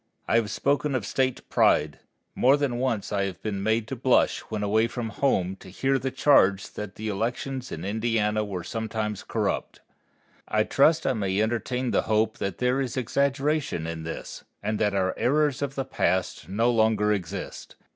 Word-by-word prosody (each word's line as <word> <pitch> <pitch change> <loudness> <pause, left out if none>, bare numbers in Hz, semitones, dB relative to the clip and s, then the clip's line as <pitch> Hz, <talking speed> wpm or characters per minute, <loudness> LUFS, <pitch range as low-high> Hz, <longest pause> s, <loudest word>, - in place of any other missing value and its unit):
I 115 - +3
have 110 -3 +1
spoken 140 +2 0
of 120 -6 -1
State 130 +2 -1
pride. 75 0 +2 0.3
More 135 +3 +4
than 135 -4 -1
once 120 -6 -1
I 100 -1 +1
have 95 -2 -5
been 100 -3 -2
made 110 +2 +1
to - - -3
blush 130 +1 +3
when 110 -2 -3
away 110 +3 +2
from 120 -1 -4
home 95 -6 0
to 95 - -13
hear 135 +8 0
the 135 - -2
charge 100 -8 +3
that 105 -2 -7
the 110 - -5
elections 120 +5 -3
in 80 +3 -5
Indiana 110 0 0
were 95 -4 -5
sometimes 110 0 -3
corrupt. - - -2 0.7
I 110 0 +2
trust 155 +7 +3
I 135 - +2
may 100 -4 -1
entertain 120 +3 -1
the - - +3
hope 110 0 +1
that 100 -3 -3
there 125 +2 +1
is 130 -1 -3
exaggeration 140 - 0
in 80 0 -4
this, 80 +1 -7 0.2
and 110 0 -1
that 105 -2 +1
our 95 -1 +1
errors 145 0 +2
of 140 -1 -2
the 135 - -2
past 90 -3 -1
no 115 +5 +2
longer 110 -2 +3
exist. 95 -1 -6
110 Hz, 180 wpm, -26 LUFS, 100-130 Hz, 0.7 s, More